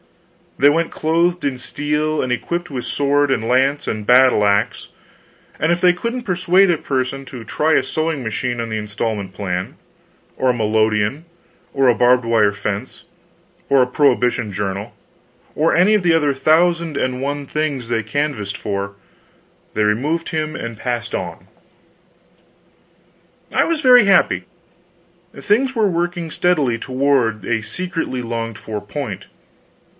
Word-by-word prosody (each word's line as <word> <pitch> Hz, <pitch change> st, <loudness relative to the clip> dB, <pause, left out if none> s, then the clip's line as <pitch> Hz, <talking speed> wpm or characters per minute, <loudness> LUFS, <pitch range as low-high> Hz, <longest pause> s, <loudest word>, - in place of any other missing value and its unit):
They 145 Hz, -, +6 dB
went 165 Hz, +3 st, 0 dB
clothed 170 Hz, +3 st, 0 dB
in 135 Hz, -2 st, -1 dB
steel 150 Hz, +4 st, -2 dB
and 130 Hz, -, -2 dB
equipped 170 Hz, +8 st, -2 dB
with 130 Hz, -4 st, -5 dB
sword 145 Hz, 0 st, +1 dB
and 115 Hz, -4 st, 0 dB
lance 135 Hz, +4 st, +1 dB
and 105 Hz, -1 st, -3 dB
battle 125 Hz, -3 st, +5 dB
axe, 100 Hz, 0 st, 0 dB, 0.7 s
and 165 Hz, -, +1 dB
if 175 Hz, -, +1 dB
they 180 Hz, -1 st, +5 dB
couldn't 235 Hz, +7 st, -4 dB
persuade 185 Hz, 0 st, +3 dB
a 170 Hz, -, +2 dB
person 135 Hz, -1 st, -2 dB
to 125 Hz, -3 st, -9 dB
try 155 Hz, +7 st, 0 dB
a -, -, +3 dB
sewing 155 Hz, +1 st, -2 dB
machine 120 Hz, +2 st, -3 dB
on 115 Hz, 0 st, -3 dB
the 110 Hz, -, -2 dB
installment 105 Hz, -2 st, -4 dB
plan, 90 Hz, -1 st, -4 dB, 0.6 s
or 130 Hz, -, +1 dB
a -, -, +3 dB
melodeon, 110 Hz, +4 st, 0 dB, 0.5 s
or 135 Hz, -1 st, +2 dB
a 120 Hz, -, +5 dB
barbed 125 Hz, +1 st, +3 dB
wire 110 Hz, -3 st, +3 dB
fence, 100 Hz, +4 st, -5 dB, 0.7 s
or 140 Hz, -1 st, +5 dB
a 125 Hz, -, +3 dB
prohibition 125 Hz, -4 st, +1 dB
journal, 100 Hz, 0 st, -4 dB, 0.6 s
or 160 Hz, +2 st, +2 dB
any 185 Hz, +5 st, +4 dB
of 210 Hz, -3 st, +2 dB
the 170 Hz, -2 st, +4 dB
other 150 Hz, -3 st, +2 dB
thousand 160 Hz, +3 st, +2 dB
and 130 Hz, 0 st, -1 dB
one 145 Hz, +1 st, -3 dB
things 145 Hz, -4 st, -2 dB
they 115 Hz, -1 st, -1 dB
canvassed 110 Hz, -4 st, -2 dB
for, 100 Hz, -1 st, -4 dB, 0.8 s
they 110 Hz, -, +1 dB
removed 140 Hz, +11 st, 0 dB
him 155 Hz, -1 st, -3 dB
and 115 Hz, -5 st, -6 dB
passed 120 Hz, -1 st, -3 dB
on. -, -, -6 dB, 2.1 s
I -, -, +3 dB
was 330 Hz, -2 st, -1 dB
very 250 Hz, -5 st, +7 dB
happy. 195 Hz, -1 st, +3 dB, 0.9 s
Things 260 Hz, +6 st, +1 dB
were 220 Hz, -2 st, +3 dB
working 175 Hz, -1 st, -2 dB
steadily 150 Hz, -8 st, +1 dB
toward 130 Hz, -5 st, 0 dB
a 110 Hz, -2 st, 0 dB
secretly 165 Hz, -1 st, -4 dB
longed 115 Hz, -2 st, -4 dB
for 105 Hz, 0 st, -6 dB
point. 105 Hz, -2 st, -6 dB
130 Hz, 150 wpm, -19 LUFS, 115-160 Hz, 2.1 s, very